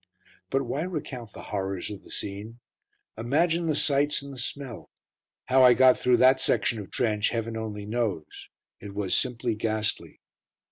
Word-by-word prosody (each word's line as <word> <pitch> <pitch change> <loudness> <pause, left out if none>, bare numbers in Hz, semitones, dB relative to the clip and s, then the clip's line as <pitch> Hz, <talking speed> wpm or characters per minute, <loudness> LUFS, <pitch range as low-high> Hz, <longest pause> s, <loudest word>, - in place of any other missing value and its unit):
But 135 +1 +1
why 135 +4 -3
recount 140 - -5
the - - -10
horrors 95 -1 -2
of 100 - -8
the - - -17
scene? 105 +4 -7 0.6
Imagine 165 +8 +1
the 155 - +1
sights 145 0 +1
and 140 0 -8
the 130 - -8
smell. 125 -3 -4 0.6
How 130 +1 +4
I 125 -1 +8
got 130 +1 +6
through 125 -1 +3
that 130 +1 +5
section 115 - +1
of 100 - -8
trench 105 -3 +1
Heaven 115 -1 -3
only 105 -2 -5
knows. 105 -8 -3 0.3
It 100 -1 -9
was 100 -2 0
simply 120 -1 0
ghastly. 110 -1 -2
120 Hz, 160 wpm, -27 LUFS, 105-135 Hz, 0.6 s, I